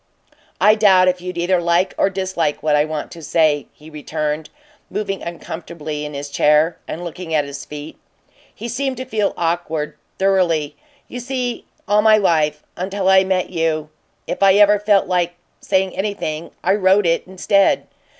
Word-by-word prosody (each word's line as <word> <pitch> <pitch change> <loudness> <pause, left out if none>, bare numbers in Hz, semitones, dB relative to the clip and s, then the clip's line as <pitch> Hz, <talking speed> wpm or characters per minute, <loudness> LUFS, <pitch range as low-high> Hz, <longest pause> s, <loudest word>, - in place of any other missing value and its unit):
"I 210 - +6
doubt 195 -4 +5
if 180 0 -2
you'd 180 0 -6
either 175 +1 +1
like 170 +2 +1
or - - +2
dislike 185 -5 -2
what 155 -1 +3
I 150 0 +3
want 155 -1 -5
to 170 - -10
say," 155 -2 +1
he 150 - -17
returned, 150 0 -4 0.4
moving 200 -2 -3
uncomfortably 160 -3 -6
in 150 -1 -7
his 140 0 -6
chair 150 +3 +3
and 170 - -5
looking 170 -1 -5
at 150 -2 +2
his 140 0 -8
feet 150 +1 -9 0.6
he 235 - -6
seemed 260 +2 -2
to 255 - -5
feel 215 -5 -1
awkward, 165 -3 -2 0.2
thoroughly. 175 -6 +1 0.3
"You 250 - -7
see, 250 -1 -3 0.2
all 205 +1 +4
my 215 0 +6
life 155 -6 +1
until 190 +1 -3
I 190 0 +6
met 185 -1 -1
you 160 -3 -1 0.3
if - - -5
I 195 -1 +6
ever 205 0 +5
felt 205 -1 +3
like 175 -1 0 0.2
saying 190 -1 0
anything, 185 -5 -3
I 190 - +3
wrote 195 0 +3
it 165 +1 +1
instead. 195 +1 +2
175 Hz, 170 wpm, -19 LUFS, 155-195 Hz, 0.6 s, I